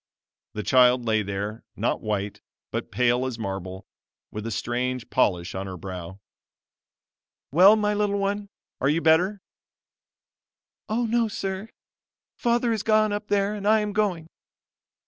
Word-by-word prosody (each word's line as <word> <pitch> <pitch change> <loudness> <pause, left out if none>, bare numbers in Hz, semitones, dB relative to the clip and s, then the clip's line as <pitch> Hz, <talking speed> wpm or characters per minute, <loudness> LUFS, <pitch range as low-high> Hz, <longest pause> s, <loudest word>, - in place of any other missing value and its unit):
The 105 - -4
child 125 0 +4
lay 110 -1 +2
there, 100 +2 -4
not - - -1
white, 105 -1 -3 0.3
but - - -3
pale 125 0 +2
as 125 -3 -5
marble, 95 -3 -5 0.5
with 105 +1 -5
a - - -3
strange 125 +2 -2
polish 90 -9 +1
on 95 +1 -4
her 95 -1 -6
brow. 95 +1 -7 1.3
"Well 185 +8 +7
my 210 -1 +1
little 205 -1 0
one, 200 +1 -2 0.3
are 135 - +2
you 155 +3 +2
better?" 175 +5 +3 1.5
"Oh 235 +3 0
no, 230 0 +2
sir; 195 0 -4 0.7
Father 235 0 +1
is 220 - -1
gone 215 -1 +3
up 210 0 -4
there 200 0 +1
and 205 -1 -4
I 220 0 +5
am 210 -1 -3
going." 190 -6 0
160 Hz, 145 wpm, -25 LUFS, -, 1.5 s, Well